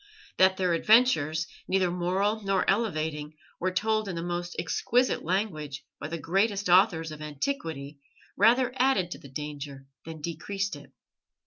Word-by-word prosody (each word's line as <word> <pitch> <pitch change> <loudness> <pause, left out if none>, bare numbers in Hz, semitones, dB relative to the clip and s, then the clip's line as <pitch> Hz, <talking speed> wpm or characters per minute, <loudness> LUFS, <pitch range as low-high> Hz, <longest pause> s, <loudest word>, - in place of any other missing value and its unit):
That 190 0 +5
their 180 -2 +1
adventures, 165 - +4 0.2
neither 185 -2 +2
moral 190 +5 0
nor 195 -2 0
elevating, 155 -8 -1 0.2
were 185 - +1
told 215 +2 0
in 180 - -4
the 165 - -3
most 175 0 -3
exquisite 245 +9 +1
language 155 -7 -2 0.2
by - - -5
the 165 +2 -4
greatest 195 +3 0
authors 175 -3 +4
of 155 0 -9
antiquity 150 - -4 0.4
rather 245 +4 +4
added 250 -10 +2
to - - -6
the 140 - -13
danger 145 -1 -6 0.2
than 160 -1 -8
decreased 180 +4 -3
it. 145 - -13
175 Hz, 145 wpm, -28 LUFS, 155-200 Hz, 0.4 s, That